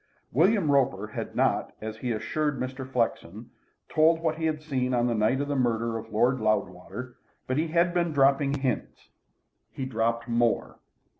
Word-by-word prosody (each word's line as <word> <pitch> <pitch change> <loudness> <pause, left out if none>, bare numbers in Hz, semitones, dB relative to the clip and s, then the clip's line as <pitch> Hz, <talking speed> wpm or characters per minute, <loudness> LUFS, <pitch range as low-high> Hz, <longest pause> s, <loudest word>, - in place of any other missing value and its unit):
William 175 - +3
Roper 125 -8 +2
had - - -6
not, - - +1
as 110 0 -6
he 125 +2 -4
had 115 - 0
assured 150 -3 -1
Mr. 130 +1 -5
Flexen, 115 -4 -2 0.4
told 160 +1 +4
what 165 -1 -1
he 160 - -1
had 155 -1 -1
seen 130 -4 -1
on 120 0 +2
the 120 - +1
night 110 +4 +2
of 145 - -2
the 145 - -1
murder 115 -3 0
of 115 0 -6
Lord 125 +4 +2
Loudwater, 110 +3 -2 0.3
but 130 - -1
he 165 - 0
had 170 +2 +2
been 175 -2 +1
dropping 140 0 +3
hints. 130 -5 -3 0.6
He 135 - -5
dropped 115 -1 -1
more. 120 0 0
130 Hz, 175 wpm, -27 LUFS, 115-150 Hz, 0.6 s, told